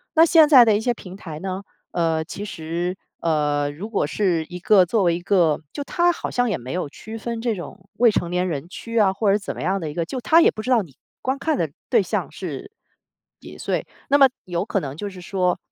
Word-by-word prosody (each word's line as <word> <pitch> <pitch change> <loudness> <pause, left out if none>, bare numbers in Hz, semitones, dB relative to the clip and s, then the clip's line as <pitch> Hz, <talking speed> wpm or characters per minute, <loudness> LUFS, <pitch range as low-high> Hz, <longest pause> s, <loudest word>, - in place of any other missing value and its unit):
那 325 +1 +7
现 320 -2 +6
在 255 -5 +9
的 220 -2 +4
一 210 - 0
些 245 +2 +1
平 185 -5 -11
台 160 -6 -8
呢， 190 +2 -4 0.3
呃， 165 -2 +1
其 200 +4 -7
实， 175 0 -4 0.2
呃， 145 -3 +1
如 185 +9 -7
果 205 -8 0
是 175 0 0
一 180 0 -7
个 195 0 +5
作 210 +3 +1
为 170 -2 +3
一 175 - -5
个 175 -5 +3
就 285 - -5
它 350 0 +2
好 - - -5
像 245 -1 +1
也 190 - 0
没 125 +4 -7
有 180 -5 -2
区 220 +9 -9
分 230 +1 -4
这 230 -1 -1
种 185 +1 -10
未 235 -1 +4
成 175 - -1
年 180 +1 0
人 150 0 -4
区 230 +5 -6
啊， 195 -2 +4
或 200 +1 +1
者 200 - +4
怎 200 - -6
么 - - -6
样 190 +4 0
的 160 -4 -4
一 - - -7
个， 170 - -1
就 220 +10 -5
它 325 +7 +5
也 - - +5
不 215 - -6
知 250 - -5
道 235 - +5
你 155 -9 -12 0.3
观 265 +1 -1
看 315 +2 0
的 - - 0 0.2
对 - - +5
象 - - -2
是 - - -7 0.7
几 - - -12
岁。 - - -2 0.2
那 285 - +5
么 275 -1 +8 0.2
有 175 +1 -2
可 210 - 0
能 140 0 -6
就 205 +2 -4
是 185 -2 -11
说， 180 -1 0
190 Hz, 265 characters per minute, -22 LUFS, 170-225 Hz, 0.7 s, 在